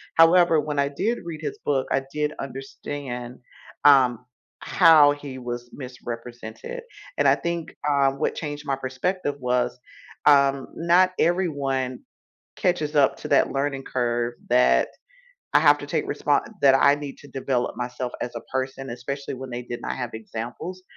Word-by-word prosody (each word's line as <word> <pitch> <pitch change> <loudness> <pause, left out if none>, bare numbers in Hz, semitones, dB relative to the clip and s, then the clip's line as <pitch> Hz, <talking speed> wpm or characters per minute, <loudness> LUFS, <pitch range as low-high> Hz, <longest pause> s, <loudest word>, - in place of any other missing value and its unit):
However, 165 0 +6
when 150 -1 -2
I 140 - +3
did 210 +12 -1
read 160 -3 -6
his 155 - -5
book, 135 -2 +1
I 135 - +2
did 150 0 -1
understand, 135 -2 -6 0.5
um, 125 -4 +5 0.4
how 160 -5 +6
he 145 -2 -6
was 120 -1 -6
misrepresented, 120 - -7 0.4
and - - +4
I - - +6
think, 170 -1 -4
um, 140 -1 +2
what - - 0
changed 145 -1 -5
my 140 -1 0
perspective 140 +5 -2
was, 125 -1 0 0.5
um, 140 -2 +4
not 175 +2 +4
everyone 140 -8 0 0.6
catches 155 -4 0
up 140 -2 +4
to - - -6
that - - +3
learning 135 -1 -2
curve 120 -1 -1 0.2
that, 65 0 +4 0.7
"I - - +8
have - - +6
to - - -7
take - - -1
respon - - +1 0.2
that 135 -1 +7
I 140 +1 +5
need 145 -2 -7
to 145 - -14
develop 130 -2 -2
myself 125 0 -4
as 120 0 -5
a 115 - -4
person," 130 0 -3
especially 135 +4 -5
when 130 0 -8
they 120 0 -4
did 120 0 -6
not - - -3
have 125 -2 -4
examples 120 +11 -6
135 Hz, 155 wpm, -24 LUFS, 125-150 Hz, 0.7 s, I